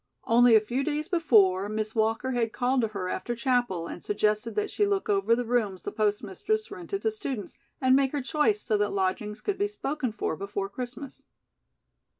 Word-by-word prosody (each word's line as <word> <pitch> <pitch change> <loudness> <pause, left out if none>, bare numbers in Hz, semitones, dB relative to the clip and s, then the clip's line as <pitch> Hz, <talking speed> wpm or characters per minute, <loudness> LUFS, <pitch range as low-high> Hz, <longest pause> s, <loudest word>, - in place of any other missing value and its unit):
Only 235 0 +5
a - - +8
few 245 +5 -2
days 305 +1 -2
before, 210 - +3
Miss 215 0 -2
Walker 225 +3 0
had 235 -3 0
called 250 +3 +1
to 225 - +1
her 200 -4 -4
after 240 +5 -3
chapel 240 -8 0
and 170 - -8
suggested 210 +2 0
that 420 0 -1
she 420 - 0
look 400 +1 -1
over 395 - +3
the 245 +1 -2
rooms 220 -6 0
the - - -4
postmistress 215 - -1
rented 395 +1 -5
to 440 - +2
students, 275 - -6 0.2
and 260 0 +4
make 270 -1 +3
her 290 - -2
choice 310 +10 +1
so 215 -3 +1
that 205 0 0
lodgings 200 +3 -1
could 405 -2 -2
be 405 - +2
spoken 300 - -3
for 210 -6 -2
before 200 +2 -4
Christmas. 250 +4 -7
240 Hz, 190 wpm, -27 LUFS, 210-295 Hz, 0.2 s, a